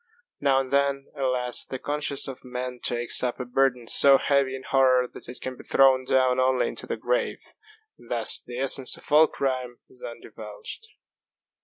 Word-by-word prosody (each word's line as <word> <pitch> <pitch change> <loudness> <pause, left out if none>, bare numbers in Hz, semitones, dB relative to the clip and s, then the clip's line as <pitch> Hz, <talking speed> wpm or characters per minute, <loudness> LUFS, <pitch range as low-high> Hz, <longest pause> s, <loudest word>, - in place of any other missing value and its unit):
Now 135 -2 +2
and 130 -1 -4
then, 140 0 0
alas, 125 -2 0
the 130 - -5
conscience 145 +1 -3
of 135 -2 -9
man 125 0 -6
takes 120 0 -1
up 125 0 -2
a 125 - -4
burthen 125 -1 0
so 135 +4 +6
heavy 140 -1 +1
in 130 - -9
horror 130 -1 +3
that - - -13
it 125 - -9
can 130 0 -5
be - - -13
thrown 130 -1 +3
down 130 -1 +2
only 130 -1 +2
into - - -7
the - - -3
grave. - - -2 0.6
And 120 - -18
thus 115 -2 +3
the 120 0 -9
essence 135 0 +3
of - - -14
all 155 +2 +6
crime 130 -4 -3
is 385 - -14
undivulged. 485 -2 -8
130 Hz, 180 wpm, -25 LUFS, 125-140 Hz, 0.6 s, so